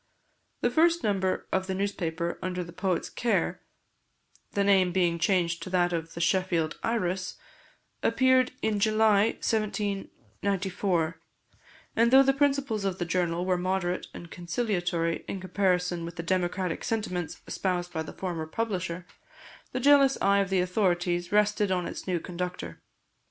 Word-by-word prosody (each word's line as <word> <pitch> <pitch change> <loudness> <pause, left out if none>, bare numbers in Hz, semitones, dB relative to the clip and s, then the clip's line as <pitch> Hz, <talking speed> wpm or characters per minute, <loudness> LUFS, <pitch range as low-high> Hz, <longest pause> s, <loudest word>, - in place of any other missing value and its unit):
The 245 - +2
first 335 +4 +3
number 190 -3 0
of 190 0 0
the 190 - -2
newspaper 170 -4 -2
under 180 0 -2
the 170 0 -11
poet's 185 -1 -1
care, 235 - -1 0.9
the 200 - +2
name 190 -2 +4
being 175 -2 +1
changed 170 -2 +1
to 175 - -6
that 175 -1 +2
of 165 -1 -4
The - - -5
Sheffield 175 -2 +1
Iris, 190 -5 -1 0.6
appeared 260 +2 +3
in 215 -2 +1
July 215 0 +3
1794; 195 -4 -1 0.8
and 230 +1 +4
though 265 +2 +8
the 270 0 +3
principles 275 -6 +1
of 190 -2 -1
the 175 - -2
journal 175 0 0
were 185 -1 +1
moderate 185 0 -1
and 170 - -10
conciliatory 175 -3 -1
in 195 - -4
comparison 180 -2 0
with 170 0 -6
the 165 - -5
democratic 180 0 -1
sentiments 180 -7 -2
espoused 180 -2 -2
by 160 - -1
the 160 - -6
former 170 -4 -4
publisher, 185 -3 -3 0.7
the 255 - -2
jealous 275 0 +5
eye 200 0 +3
of 195 -2 0
the 190 -1 +2
authorities 175 -2 0
rested 210 -1 +2
on 180 -1 0
its - - -7
new 180 -2 0
conductor. 175 - -5
185 Hz, 145 wpm, -28 LUFS, 175-210 Hz, 0.9 s, though